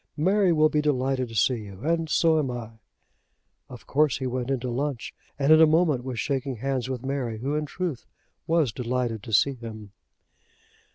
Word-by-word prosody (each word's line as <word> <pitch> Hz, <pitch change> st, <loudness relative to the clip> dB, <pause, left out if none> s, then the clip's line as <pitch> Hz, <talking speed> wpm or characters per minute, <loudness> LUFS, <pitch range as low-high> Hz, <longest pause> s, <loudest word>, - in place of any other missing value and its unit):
Mary 190 Hz, +4 st, +3 dB
will 155 Hz, -1 st, +4 dB
be 150 Hz, 0 st, +1 dB
delighted 135 Hz, -3 st, 0 dB
to 115 Hz, -, -9 dB
see 120 Hz, +1 st, +2 dB
you, 100 Hz, 0 st, -11 dB
and 165 Hz, +2 st, 0 dB
so 160 Hz, 0 st, +3 dB
am 140 Hz, -4 st, -1 dB
I." 115 Hz, -2 st, -7 dB, 0.9 s
Of -, -, -11 dB
course 150 Hz, -1 st, +2 dB
he 130 Hz, -, -4 dB
went 125 Hz, 0 st, -3 dB
in 135 Hz, -2 st, 0 dB
to 125 Hz, -, -3 dB
lunch, 135 Hz, 0 st, -3 dB, 0.2 s
and 140 Hz, +2 st, +4 dB
in 155 Hz, -, +7 dB
a 160 Hz, -, +8 dB
moment 155 Hz, -5 st, +2 dB
was 125 Hz, -3 st, -4 dB
shaking 135 Hz, -3 st, -2 dB
hands 130 Hz, +1 st, -2 dB
with 130 Hz, -1 st, -4 dB
Mary, 130 Hz, -5 st, -2 dB
who 135 Hz, +6 st, -3 dB
in 150 Hz, 0 st, -1 dB
truth 170 Hz, -6 st, -4 dB, 0.4 s
was 160 Hz, -6 st, +2 dB
delighted 120 Hz, -1 st, -2 dB
to 115 Hz, 0 st, -9 dB
see 135 Hz, +7 st, +4 dB
him. 110 Hz, -4 st, -9 dB
135 Hz, 190 wpm, -26 LUFS, 120-150 Hz, 0.9 s, a